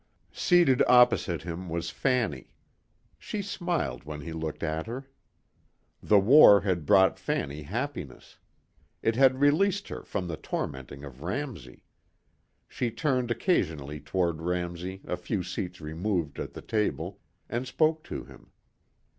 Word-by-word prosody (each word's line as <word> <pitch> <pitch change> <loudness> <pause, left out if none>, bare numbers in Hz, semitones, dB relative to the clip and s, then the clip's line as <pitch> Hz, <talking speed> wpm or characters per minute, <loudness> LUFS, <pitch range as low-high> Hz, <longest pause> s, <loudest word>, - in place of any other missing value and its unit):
Seated 175 -8 +4
opposite 125 -8 +4
him 90 +1 -6
was 85 +1 -3
Fanny. 115 - -1 0.6
She 205 -2 -4
smiled 175 -4 -2
when 75 0 -7
he 80 +3 -6
looked 80 -1 -5
at 80 +3 -2
her. 130 +4 -6 0.9
The 105 - +4
war 105 -1 +8
had 90 -6 -1
brought 95 -2 +5
Fanny 70 +2 -2
happiness. 110 - -6 0.6
It 115 - +2
had 130 0 +4
released 190 +8 +2
her - - -6
from 90 - -4
the 80 -2 -4
tormenting 70 -1 -5
of 70 -2 -10
Ramsey. 95 - -5 0.8
She 120 - -2
turned 125 0 0
occasionally 80 - 0
toward 80 +2 -1
Ramsey 90 +2 -3
a - - -2
few 90 +2 -3
seats 90 0 -5
removed 80 0 -2
at - - -5
the - - -9
table 105 -2 -2 0.3
and 120 +2 -3
spoke 155 +4 +1
to - - -5
him. - - -16
95 Hz, 135 wpm, -28 LUFS, 80-130 Hz, 0.9 s, war